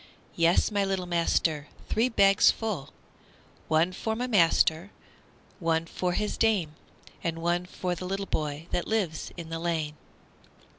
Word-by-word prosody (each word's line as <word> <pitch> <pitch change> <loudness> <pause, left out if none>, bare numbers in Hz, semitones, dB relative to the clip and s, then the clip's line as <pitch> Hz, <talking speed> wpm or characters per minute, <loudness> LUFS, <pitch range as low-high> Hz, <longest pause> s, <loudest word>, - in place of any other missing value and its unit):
Yes, 170 +5 +3
my 205 -1 +1
little 195 -2 -1
master, 165 -3 +1 0.2
three 230 +3 +2
bags 195 -4 +5
full; 195 -11 -2 0.8
One 160 +3 +3
for 220 +4 -3
my 245 +2 -2
master 170 -4 +3
and - - -29
one 165 -2 +1
for 180 +1 -2
his 210 +3 -1
dame, 200 -9 +2 0.5
And 165 -1 -2
one 175 +2 0
for 180 0 -3
the 180 +1 -6
little 195 +2 -2
boy 150 -2 -3
that 175 - -1
lives 195 -8 -1
in 165 -2 -7
the 165 0 -4
lane. 160 -3 -2
175 Hz, 150 wpm, -28 LUFS, 165-195 Hz, 0.8 s, bags